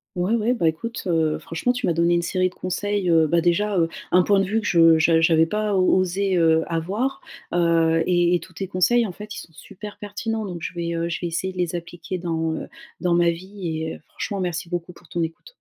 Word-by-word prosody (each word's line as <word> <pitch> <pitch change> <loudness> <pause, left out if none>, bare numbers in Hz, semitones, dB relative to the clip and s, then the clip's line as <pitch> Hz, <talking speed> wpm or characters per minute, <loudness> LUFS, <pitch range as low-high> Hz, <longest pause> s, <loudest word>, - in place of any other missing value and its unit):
Ouais 180 +5 0
ouais, 230 +1 +2
bah, 200 -10 +2
écoute, 230 +9 -4
heu, 160 -3 +1
franchement 165 +9 -1
tu 250 - -3
m'as 170 - +1
donné 170 +1 +2
une 175 - +3
série 185 +1 0
de - - -22
conseils, 195 +1 -2
heu, 160 -1 +5
bah, 170 +2 +2
déjà, 185 +4 +1
heu, 165 -1 +3 0.2
un 180 - +5
point 200 +2 +3
de - - +2
vue 215 +4 0
que 205 - -6
je 165 -2 +6
j'a 165 0 +4
j'avais 160 0 +4
pas 210 +3 -1
o 190 - +3 0.2
osé, 185 +1 +1
heu, 160 -1 +4
avoir, 195 +11 -2 0.3
heu, 165 -1 +3
et 175 -1 +3
et - - +3
tous - - -13
tes 190 +2 -5
conseils 225 +6 +2
en 185 - -6
fait 210 +2 -9
ils - - -7
sont 165 - -11
super 205 +6 -10
pertinents 215 +2 -4
donc 180 -4 -6
je 170 - -5
vais, 170 0 -3
heu, 165 0 -1
je 170 - -3
vais 175 - -1
essayer 185 +3 -3
de - - -9
les 175 -1 -1
appliquer 175 +2 -6
dans, 165 -2 -2
heu, - - -6 0.3
dans 175 -1 +1
ma 170 0 +4
vie 170 -2 -5
et, 160 - -4
heu, - - -13
franchement 200 -2 -5
merci 175 -1 -3
beaucoup 175 0 -4
pour 175 -1 -19
ton 170 - -2
écoute. 165 - -6
175 Hz, 250 wpm, -23 LUFS, 165-195 Hz, 0.3 s, je